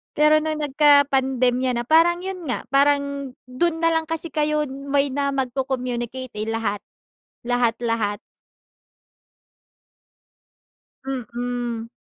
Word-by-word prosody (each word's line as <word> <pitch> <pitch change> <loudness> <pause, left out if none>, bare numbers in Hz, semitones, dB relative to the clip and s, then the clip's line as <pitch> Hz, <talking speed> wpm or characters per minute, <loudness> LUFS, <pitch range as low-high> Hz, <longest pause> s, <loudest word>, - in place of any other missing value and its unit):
Pero 305 0 +4
nung 310 -1 -2
nagkapandemya 270 -3 +3
na 240 -1 -2
parang 335 +2 +4
yun 370 -1 -6
nga 255 -6 -4
parang 280 0 +1 0.2
dun 325 +6 0
nalang 330 -1 +2
kasi 325 +1 -4
kayo 300 -1 0
may 275 +1 -1
na 280 +1 -1
magco-communicate, 255 -2 -3
eh, 215 +1 -3
lahat 220 -2 -2 0.6
lahat-lahat. 230 -3 0 2.9
Mm. 245 -2 -4
270 Hz, 95 wpm, -22 LUFS, 245-300 Hz, 2.9 s, Pero